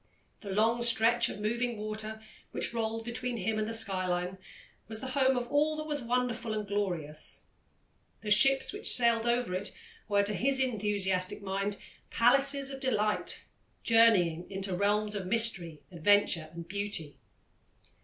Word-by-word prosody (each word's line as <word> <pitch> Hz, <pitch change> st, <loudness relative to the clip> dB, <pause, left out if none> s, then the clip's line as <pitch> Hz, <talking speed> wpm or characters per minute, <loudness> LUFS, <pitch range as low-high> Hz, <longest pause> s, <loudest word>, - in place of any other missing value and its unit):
The 205 Hz, -, -10 dB
long 225 Hz, +4 st, +1 dB
stretch 235 Hz, 0 st, +4 dB
of -, -, -7 dB
moving 235 Hz, +2 st, -2 dB
water, 215 Hz, +1 st, -6 dB, 0.3 s
which -, -, -2 dB
rolled 225 Hz, 0 st, -3 dB
between 245 Hz, 0 st, -4 dB
him 215 Hz, +2 st, -2 dB
and 215 Hz, -, -2 dB
the -, -, -4 dB
skyline, 185 Hz, -4 st, -1 dB, 0.5 s
was 220 Hz, 0 st, -6 dB
the 260 Hz, -, -6 dB
home 265 Hz, 0 st, +2 dB
of 245 Hz, -1 st, -3 dB
all 300 Hz, +2 st, +1 dB
that 310 Hz, -, -4 dB
was 295 Hz, -2 st, -3 dB
wonderful 240 Hz, -2 st, -2 dB
and 210 Hz, -1 st, -4 dB
glorious; 175 Hz, -7 st, -4 dB, 0.8 s
the 210 Hz, -, -4 dB
ships 270 Hz, -, +6 dB
which 415 Hz, +2 st, -1 dB
sailed 235 Hz, -1 st, +3 dB
over 240 Hz, -5 st, 0 dB
it 190 Hz, +3 st, -4 dB, 0.3 s
were, 200 Hz, -1 st, +2 dB
to 205 Hz, +1 st, -3 dB
his 265 Hz, +7 st, +1 dB
enthusiastic 205 Hz, -5 st, 0 dB
mind, 200 Hz, +1 st, -3 dB, 0.3 s
palaces 275 Hz, +3 st, +2 dB
of 270 Hz, -, -7 dB
delight, 215 Hz, -6 st, -1 dB, 0.4 s
journeying 190 Hz, -8 st, +3 dB
into 195 Hz, -1 st, -3 dB
realms 210 Hz, +2 st, 0 dB
of 195 Hz, -3 st, -4 dB
mystery, 190 Hz, -8 st, 0 dB
adventure, 175 Hz, -2 st, +2 dB
and 170 Hz, 0 st, -9 dB
beauty. 200 Hz, -7 st, -3 dB
215 Hz, 150 wpm, -30 LUFS, 195-240 Hz, 0.8 s, ships